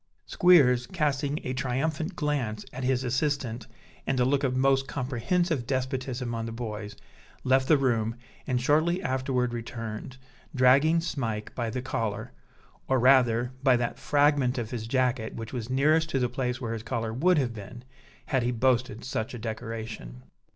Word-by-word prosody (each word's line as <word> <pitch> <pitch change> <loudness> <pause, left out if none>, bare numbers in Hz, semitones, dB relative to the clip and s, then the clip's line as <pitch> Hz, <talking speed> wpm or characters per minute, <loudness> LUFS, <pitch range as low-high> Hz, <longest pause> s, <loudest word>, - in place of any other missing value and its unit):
Squeers, 130 -9 +5
casting 150 -3 -1
a 130 - -3
triumphant 140 +7 -2
glance 135 -10 -2
at 130 - -5
his 130 0 +1
assistant 125 -3 -1 0.4
and 130 - +1
a 125 - +4
look 140 +2 +1
of 130 -1 0
most 135 0 +3
comprehensive 135 +2 -1
despotism 130 -2 -2
on 115 0 -3
the - - -5
boys, 110 -3 -6 0.5
left 130 0 +3
the 155 - +6
room, 115 -4 0 0.3
and 125 -2 +1
shortly 155 +7 +2
afterward 130 -2 0
returned, 115 +1 -6 0.4
dragging 140 +6 +5
Smike 115 -10 -3
by 120 -2 -2
the 125 +3 -4
collar 115 -5 -3 0.6
or 130 - +2
rather 125 -1 +4
by 130 -3 +4
that 120 -1 -3
fragment 145 -3 +2
of 115 -3 -3
his 115 -2 -4
jacket 125 -2 0
which 115 +2 -7
was 120 -2 -4
nearest 155 +5 +3
to 135 - 0
the 125 -2 +2
place 125 0 -2
where 115 -3 -3
his 115 - -4
collar 115 -1 -3
would 175 +8 +3
have 125 -5 0
been, 110 +3 -9 0.4
had 130 - +1
he 120 - 0
boasted 125 -2 0
such 125 -3 -3
a - - -5
decoration. 110 - -6
125 Hz, 165 wpm, -27 LUFS, 115-135 Hz, 0.6 s, the